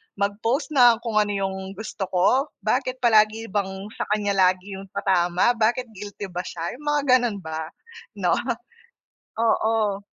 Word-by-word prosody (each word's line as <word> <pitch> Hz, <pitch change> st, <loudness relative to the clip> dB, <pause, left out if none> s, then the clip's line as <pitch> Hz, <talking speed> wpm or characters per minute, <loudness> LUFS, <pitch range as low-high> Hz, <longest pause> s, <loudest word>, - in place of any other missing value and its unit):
mag 200 Hz, +1 st, -1 dB
post 255 Hz, +8 st, -1 dB
ng 240 Hz, -5 st, +5 dB
kung 225 Hz, -3 st, +1 dB
ano 210 Hz, -, +2 dB, 0.2 s
yung 190 Hz, 0 st, -4 dB
gusto 200 Hz, -1 st, -5 dB
ko? 190 Hz, +10 st, +2 dB, 0.2 s
Bakit 255 Hz, 0 st, -1 dB
palagi 220 Hz, -1 st, +3 dB
bang 200 Hz, -1 st, 0 dB, 0.3 s
sa -, -, -2 dB
kanya 205 Hz, -1 st, -1 dB
lagi 190 Hz, 0 st, +1 dB
yung 195 Hz, -, -10 dB
patama, 180 Hz, +2 st, +2 dB
bakit 235 Hz, +1 st, 0 dB
guilty 205 Hz, -1 st, -8 dB
ba 175 Hz, -, -4 dB
siya 170 Hz, -1 st, -4 dB
yung 295 Hz, -, -11 dB
mga 295 Hz, 0 st, +2 dB, 0.2 s
ganon 240 Hz, -4 st, -1 dB
ba? 160 Hz, 0 st, -4 dB, 0.5 s
No, -, -, 0 dB, 1.1 s
oo. 220 Hz, -3 st, +1 dB
205 Hz, 155 wpm, -24 LUFS, 190-230 Hz, 1.1 s, ng